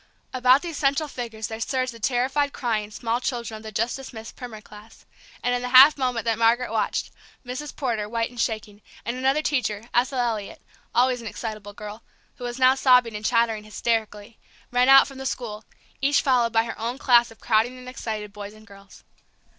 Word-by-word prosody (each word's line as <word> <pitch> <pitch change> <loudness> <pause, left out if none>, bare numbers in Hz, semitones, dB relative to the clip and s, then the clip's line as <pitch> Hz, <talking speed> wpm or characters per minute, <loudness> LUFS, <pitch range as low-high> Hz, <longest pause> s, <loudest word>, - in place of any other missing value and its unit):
About 255 +3 +4
these 335 -4 -5
central 280 +2 +1
figures 230 -5 -6
there 220 +2 -5
surged 255 +1 -1
the 230 - -12
terrified 265 +5 0
crying 220 -4 -2
small 230 +3 -2
children 235 -3 -3
of - - -12
the 220 0 -8
just 230 +3 -1
dismissed 235 -4 -9
primer 240 -4 -8
class, 210 +1 -15 0.4
and 245 - +1
in 245 - 0
the 250 - -3
half 265 +4 +9
moment 250 -4 -1
that 225 -1 0
Margaret 230 +1 +3
watched, 225 - -1 0.3
Mrs. 255 +4 -6
Porter, 225 -7 -2
white 230 +1 -1
and 245 -2 -4
shaking, 215 -3 -3 0.2
and 235 - -2
another 270 +4 +1
teacher, 235 -8 -1
Ethel 255 +3 +1
Elliot, 230 -4 -2
an - - -38 0.3
always 250 0 +3
excitable 215 -2 -6
girl, 210 +2 -9 0.4
who - - -10
was 240 +1 -4
now 260 0 +6
sobbing 250 -4 +4
and 210 - -6
chattering 225 -1 +1
hysterically, 215 0 -3 0.3
ran 250 +1 +3
out 270 0 +8
from 270 -1 -11
the 265 - -6
school, 220 -4 -5 0.4
each 280 +1 +3
followed 245 -4 +3
by 225 0 +3
her 230 - -7
own 235 +3 -3
class 240 -3 +4
of 225 - -16
crowding 230 +3 +1
and 250 0 -12
excited 215 -5 -5
boys 205 0 -8
and 215 0 -16
girls. 200 -2 -16
235 Hz, 195 wpm, -24 LUFS, 220-255 Hz, 0.4 s, half